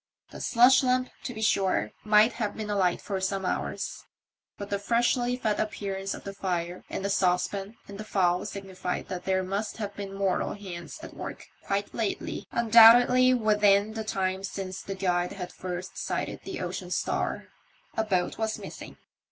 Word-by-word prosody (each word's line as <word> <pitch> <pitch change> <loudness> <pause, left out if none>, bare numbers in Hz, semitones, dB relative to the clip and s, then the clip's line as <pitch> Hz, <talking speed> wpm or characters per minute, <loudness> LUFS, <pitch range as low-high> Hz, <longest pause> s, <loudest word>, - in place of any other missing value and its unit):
The - - -9
slush 250 +2 +6
lamp, 255 -1 +1
to - - -3
be 220 -2 -5
sure, 190 - +2
might 215 +2 +5
have 210 -4 -3
been 215 -1 -4
alight 185 -4 +2
for 195 -2 -3
some 190 0 -1
hours, - - -3 0.5
but 200 0 -7
the 200 - 0
freshly 240 +3 +1
fed 215 -4 0
appearance 195 -2 -3
of - - -11
the 200 - -6
fire 180 -2 -3
and 195 - -4
the - - 0
saucepan 195 +2 0
and 200 0 -9
the - - -4
fowl 180 -4 +1
signified 190 -2 -5
that 180 -1 -5
there 190 0 +1
must 200 +3 -3
have 205 -2 -5
been 195 -1 -6
mortal 195 -2 0
hands 185 - -8
at - - -9
work - - -7 0.2
quite 200 0 -1
lately 220 -3 -3
— - - -57
undoubtedly 235 +2 +7
within 210 -2 +3
the 220 0 -3
time 190 -2 -1
since 190 -1 -5
the 195 - -5
Guide 180 -2 0
had 180 -2 -7
first 185 0 -6
sighted - - -3
the - - -5
Ocean - - -4
Star. - - -2 0.5
A 220 - +1
boat 190 -3 -1
was 220 -1 -1
missing. - - -9
200 Hz, 175 wpm, -28 LUFS, 190-220 Hz, 0.5 s, undoubtedly